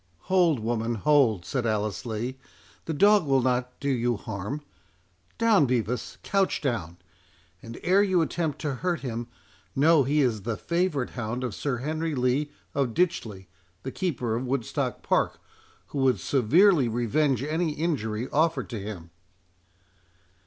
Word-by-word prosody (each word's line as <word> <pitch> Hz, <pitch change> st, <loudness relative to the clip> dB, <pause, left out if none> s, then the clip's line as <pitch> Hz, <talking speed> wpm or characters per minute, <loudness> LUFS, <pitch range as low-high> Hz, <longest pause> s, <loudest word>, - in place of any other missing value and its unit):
"Hold, 170 Hz, -7 st, +4 dB
woman, 115 Hz, +1 st, -1 dB
hold!" 115 Hz, -7 st, +3 dB
said 125 Hz, 0 st, -1 dB
Alice 110 Hz, +2 st, -2 dB
Lee; 120 Hz, +4 st, -4 dB, 0.5 s
"the -, -, -3 dB
dog 200 Hz, +1 st, +4 dB
will 135 Hz, -2 st, +3 dB
not 125 Hz, 0 st, -1 dB
do 140 Hz, -, -4 dB
you 120 Hz, -3 st, +1 dB
harm.—Down, 100 Hz, -, -2 dB
Bevis, 120 Hz, 0 st, -2 dB
couch 195 Hz, -1 st, +1 dB
down.—And 90 Hz, -, -7 dB
ere 190 Hz, +3 st, +4 dB
you 185 Hz, -4 st, +3 dB
attempt 160 Hz, -2 st, -2 dB
to 150 Hz, -3 st, -1 dB
hurt 180 Hz, -2 st, 0 dB
him, 120 Hz, -3 st, -4 dB, 0.5 s
know 155 Hz, +2 st, +5 dB
he 145 Hz, +3 st, +2 dB
is 115 Hz, -6 st, +1 dB
the 115 Hz, +1 st, -3 dB
favourite 170 Hz, -7 st, -1 dB
hound 120 Hz, +1 st, -4 dB
of 125 Hz, -4 st, -3 dB
Sir 135 Hz, +3 st, -2 dB
Henry 155 Hz, +4 st, -2 dB
Lee 130 Hz, +4 st, +1 dB, 0.2 s
of 135 Hz, -5 st, -1 dB
Ditchley, 115 Hz, -, -1 dB, 0.4 s
the 130 Hz, -, -4 dB
keeper 130 Hz, -11 st, -2 dB
of 125 Hz, +2 st, -3 dB
Woodstock 125 Hz, -3 st, -2 dB
Park, -, -, +1 dB, 0.5 s
who 145 Hz, -, -4 dB
would 130 Hz, -2 st, +3 dB
severely 145 Hz, -, +4 dB
revenge 120 Hz, +3 st, +1 dB
any 155 Hz, +2 st, -1 dB
injury 130 Hz, -8 st, -2 dB
offered 160 Hz, 0 st, +1 dB
to 115 Hz, -, -4 dB
him." 95 Hz, -5 st, -7 dB
130 Hz, 140 wpm, -26 LUFS, 110-155 Hz, 0.5 s, know